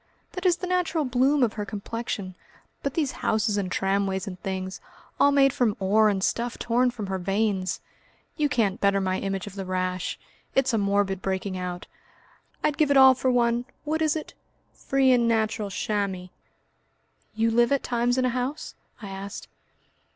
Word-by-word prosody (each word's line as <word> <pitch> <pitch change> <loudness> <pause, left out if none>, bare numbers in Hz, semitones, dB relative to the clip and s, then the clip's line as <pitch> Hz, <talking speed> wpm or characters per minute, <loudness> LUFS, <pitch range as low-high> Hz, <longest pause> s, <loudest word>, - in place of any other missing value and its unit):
That 365 0 -1
is 350 -1 +3
the 365 - -5
natural 355 -4 0
bloom 260 +3 +3
of 225 -3 +1
her 210 - -3
complexion. 205 -1 -5 0.5
But 280 - -3
these 300 -5 +1
houses 215 -1 +1
and 195 -3 -2
tramways 195 0 0
and 185 -3 -8
things, 190 -1 -4 0.4
all 285 - +6
made 275 -2 +4
from 245 -7 +1
ore 210 +3 +4
and 195 -2 -1
stuff 235 +3 -1
torn 245 +2 +2
from 230 -4 -5
her 190 -1 -3
veins! 195 0 -1 0.5
You 300 -2 +1
can't 210 -7 0
better 200 0 +3
my 185 -1 -1
image 195 -1 -3
of 205 - -9
the 195 -1 -5
rash. 185 -1 -2 0.4
It's 265 -2 +2
a 225 - +2
morbid 200 -1 +1
breaking 190 0 -2
out! 180 -1 -5 0.8
I'd 295 - 0
give 305 -2 +4
it 285 - +4
all 265 -1 +9
for 260 0 -1
one 240 -1 +2 0.2
what 315 +1 -1
is 310 -1 +2
it? 310 - -5 0.4
free 270 -1 +2
and 240 -2 +4
natural 220 -2 0
chamois." 195 -2 -2 1.1
"You 225 +1 +2
live 235 +2 +3
at 280 - +2
times 245 +1 0
in 255 - +2
a - - +2
house?" 255 +4 -3 0.3
I 200 - -6
asked. 195 +1 -7
220 Hz, 180 wpm, -26 LUFS, 195-260 Hz, 1.1 s, all